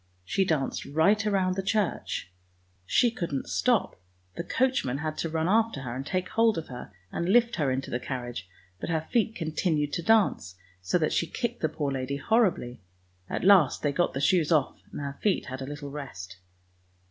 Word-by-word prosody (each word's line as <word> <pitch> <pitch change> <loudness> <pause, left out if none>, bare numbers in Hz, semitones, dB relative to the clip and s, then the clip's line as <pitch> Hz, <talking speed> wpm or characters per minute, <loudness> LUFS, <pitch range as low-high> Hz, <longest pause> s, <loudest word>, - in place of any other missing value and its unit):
She 190 - +1
danced 155 -7 -1
right 160 +10 +3
round 190 -3 +2
the 195 - -1
church; 200 - -1 0.6
she 240 - +4
couldn't 170 - -3
stop; 240 - +1 0.3
the - - -3
coach 260 +8 +1
man 130 0 -2
had 155 +1 -3
to 165 - -1
run 160 +1 0
after 220 -5 +2
her 120 -3 -5
and 130 - -4
take 185 +5 -2
hold 225 -3 +3
of 160 - -5
her, 125 -4 -8 0.2
and 170 - -2
lift 235 +2 +4
her 145 -4 +1
into 130 +1 -2
the 120 - -1
carriage; 120 -7 -5 0.3
but - - -5
her 160 -1 -1
feet 225 -1 +2
continued 155 -3 -1
to - - -1
dance, 170 - +2 0.3
so 90 - +1
that 155 -3 0
she 170 - +1
kicked 240 +4 -3
the 155 - +1
poor 145 -2 -2
lady 135 +1 -2
horribly. 145 - +1 0.5
At - - -3
last 185 -8 +5
they 145 - +2
got 175 +2 0
the 135 - -1
shoes 170 0 +3
off, 150 -5 +2
and - - -6
her 140 -1 -5
feet 205 -3 +1
had 130 +1 -6
a 130 - -5
little 145 -1 -6
rest. 100 -10 -8
160 Hz, 195 wpm, -28 LUFS, 135-195 Hz, 0.6 s, last